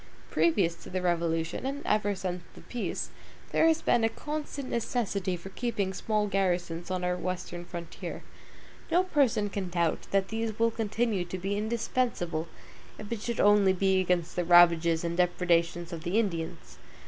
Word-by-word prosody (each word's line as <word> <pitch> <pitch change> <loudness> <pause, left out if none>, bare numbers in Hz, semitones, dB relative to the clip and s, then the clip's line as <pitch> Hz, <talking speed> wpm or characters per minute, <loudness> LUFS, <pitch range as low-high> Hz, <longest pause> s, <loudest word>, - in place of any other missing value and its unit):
Previous 195 - +3
to - - -12
the 185 - -2
Revolution, 170 -2 0
and 275 +2 -4
ever 205 -1 +1
since 180 -1 -3
the - - -12
peace, 245 - -4 0.4
there 325 - +4
has 325 0 +2
been 235 - +3
a 225 - +4
constant 295 0 -5
necessity 205 -6 -1
for 185 +3 -9
keeping 200 -3 -2
small 215 +2 0
garrisons 180 -4 -1
on 185 -1 -2
our 180 0 +1
Western 180 -1 -4
frontier. 170 -1 -7 0.7
No 360 +2 +4
person 275 - +2
can 195 -2 -4
doubt 170 -2 0
that 195 -1 +1
these 225 -1 -2
will 230 0 +3
continue 220 -2 0
to 175 +2 -5
be 195 +2 -2
indispensable, 215 -6 -1 0.5
if 215 0 -9
it 230 -3 -2
should 235 +1 -3
only 205 -2 +5
be 190 0 +2
against 180 -2 0
the 180 - +1
ravages 170 -1 +5
and 170 0 -1
depredations 175 -1 +1
of 165 - -5
the 180 +4 0
Indians. 170 -8 -2
190 Hz, 165 wpm, -29 LUFS, 175-225 Hz, 0.7 s, only